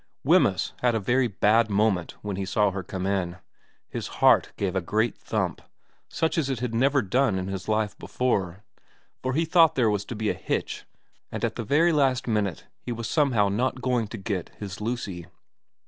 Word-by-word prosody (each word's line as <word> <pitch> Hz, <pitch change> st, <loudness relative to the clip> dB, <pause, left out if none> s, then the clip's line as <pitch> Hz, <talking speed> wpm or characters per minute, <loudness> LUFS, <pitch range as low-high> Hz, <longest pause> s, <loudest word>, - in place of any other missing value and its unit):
Wemyss -, -, +3 dB
had 120 Hz, -2 st, +2 dB
a -, -, +1 dB
very 125 Hz, +5 st, +2 dB
bad 110 Hz, +2 st, +3 dB
moment 100 Hz, -4 st, +1 dB
when 105 Hz, -2 st, -3 dB
he 95 Hz, -, -3 dB
saw 105 Hz, +1 st, +1 dB
her 95 Hz, 0 st, -4 dB
come 95 Hz, 0 st, -5 dB
in. 95 Hz, -3 st, -1 dB, 0.5 s
His -, -, -5 dB
heart -, -, +5 dB
gave 95 Hz, -2 st, -1 dB
a 95 Hz, -, +1 dB
great 110 Hz, +6 st, 0 dB
thump, -, -, -2 dB, 0.5 s
such 165 Hz, 0 st, 0 dB
as 140 Hz, -4 st, -1 dB
it 130 Hz, -4 st, -2 dB
had 125 Hz, -1 st, -3 dB
never 135 Hz, +4 st, +3 dB
done 110 Hz, +1 st, +1 dB
in 95 Hz, 0 st, -3 dB
his 95 Hz, -1 st, -5 dB
life 110 Hz, -1 st, 0 dB
before, 100 Hz, -7 st, -1 dB, 0.6 s
for 130 Hz, 0 st, -1 dB
he 165 Hz, +4 st, +1 dB
thought 165 Hz, -1 st, +5 dB
there 115 Hz, -5 st, +3 dB
was 100 Hz, -1 st, -1 dB
to 120 Hz, -, -6 dB
be 110 Hz, 0 st, 0 dB
a -, -, -1 dB
hitch -, -, -3 dB, 0.5 s
and -, -, -5 dB
that -, -, +1 dB
at -, -, -31 dB
the -, -, -3 dB
very 155 Hz, +10 st, +3 dB
last 135 Hz, -4 st, +2 dB
minute 105 Hz, -5 st, -1 dB, 0.2 s
he -, -, -6 dB
was 115 Hz, -1 st, -4 dB
somehow 130 Hz, -10 st, +2 dB
not 125 Hz, +6 st, -1 dB
going 125 Hz, -3 st, 0 dB
to 115 Hz, -, -7 dB
get 95 Hz, -3 st, -3 dB
his 100 Hz, -1 st, -7 dB
Lucy. 105 Hz, -7 st, -4 dB
110 Hz, 200 wpm, -26 LUFS, 100-125 Hz, 0.6 s, heart